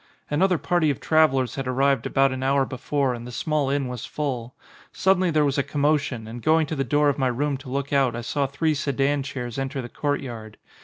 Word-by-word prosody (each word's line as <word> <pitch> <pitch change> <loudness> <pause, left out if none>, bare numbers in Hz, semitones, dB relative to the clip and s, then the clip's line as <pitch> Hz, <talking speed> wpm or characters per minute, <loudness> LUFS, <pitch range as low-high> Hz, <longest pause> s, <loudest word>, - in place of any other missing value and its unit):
Another 180 +4 +3
party 175 -1 +1
of 140 - -1
travellers 135 -6 +3
had 135 -2 -4
arrived 135 0 +1
about 135 0 +3
an 130 0 -4
hour 135 +1 +2
before 130 +1 -1
and 120 0 -7
the - - -7
small 150 +3 -1
inn 140 -1 0
was 125 -2 -6
full. 130 -5 -4 0.4
Suddenly 185 -1 +2
there 155 -2 +3
was 140 0 0
a - - +2
commotion 145 -5 0
and 120 +2 -7
going 160 +2 +3
to 155 - -4
the 135 - 0
door 145 +3 +2
of 140 0 +1
my 130 - +2
room 140 +4 0
to 135 -1 -11
look 140 +2 -3
out 135 -4 +3
I 120 - -4
saw 140 +4 -1
three 155 +4 0
sedan 140 0 0
chairs 130 -3 -5
enter 135 +1 -3
the 120 -2 -5
court 145 +2 -1
yard. 110 -5 -8
140 Hz, 225 wpm, -24 LUFS, 130-150 Hz, 0.4 s, Another